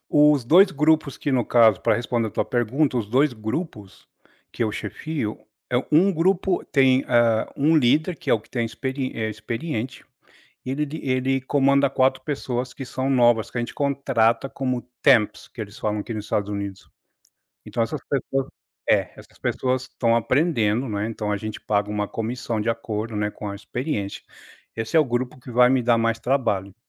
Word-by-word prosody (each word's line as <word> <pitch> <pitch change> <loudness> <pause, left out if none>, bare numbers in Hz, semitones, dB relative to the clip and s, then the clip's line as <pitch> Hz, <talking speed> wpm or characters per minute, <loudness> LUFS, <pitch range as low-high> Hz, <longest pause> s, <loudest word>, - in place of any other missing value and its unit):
os 150 -3 +4
2 185 - +6
grupos 150 -1 +2
que, 145 - -2
no 125 -3 +2
caso, 110 -5 +4
pra - - +2
responder 120 -1 -1
a - - -9
tua - - -1
pergunta, 125 +3 0
os 110 -4 -1
2 135 +4 +3
grupos 110 - -6 0.4
que - - -3
eu 110 - 0
chefio, 110 +3 -4 0.3
eh, - - +3
1 180 +6 +5
grupo 185 +2 +1
tem, 130 -1 +3
ah, 115 -2 +3
1 155 +4 +3
líder, 155 +6 +2
que - - -4
é - - +6
o 110 - -1
que - - -24
tem 120 -2 -1
experi 130 +3 -4
eh, 110 -1 -2
experiente, 115 +3 -5 0.6
e 130 - -4
ele 150 +3 0
d 150 +2 -7
ele 130 0 0
comanda 140 +1 +3
4 130 -1 +1
pessoas 130 -3 -3
que 135 - -6
são 130 +1 -3
novas, 120 -4 +3
que 120 - -4
a - - +1
gente 120 - -5
contrata 135 -4 +1
como 130 -2 -2 0.2
temps, 120 -7 +3
que - - -11
eles 105 -1 -7
falam 105 -1 -1
aqui 115 - -6
nos 105 -1 -5
Estados 105 0 -1
Unidos. 100 -1 -6 0.8
Então 115 - -1
essas 115 - -3
pessoas 135 -1 -1 0.4
é, - - +3
essas - - -16
pessoas 130 0 -1
estão 115 -2 0
aprendendo, 125 -2 +1
não 105 -2 -3
é, 105 +2 -1
então 105 -2 -4
a 105 - 0
gente 110 0 -6
paga 105 0 0
uma 105 0 -1
comissão 115 0 -3
de 105 - -2
acordo, 110 -1 -4
né, 105 0 -1
com 105 - -7
a 100 - -5
experiência. 100 0 -4 0.5
Esse 115 +4 -4
é - - +8
o - - +3
grupo 125 0 -2
que 125 - -11
vai 125 +1 +5
me 130 -1 +2
dar 120 0 +3
mais 115 0 +1
trabalho. 110 -8 -1
120 Hz, 195 wpm, -23 LUFS, 110-135 Hz, 0.8 s, é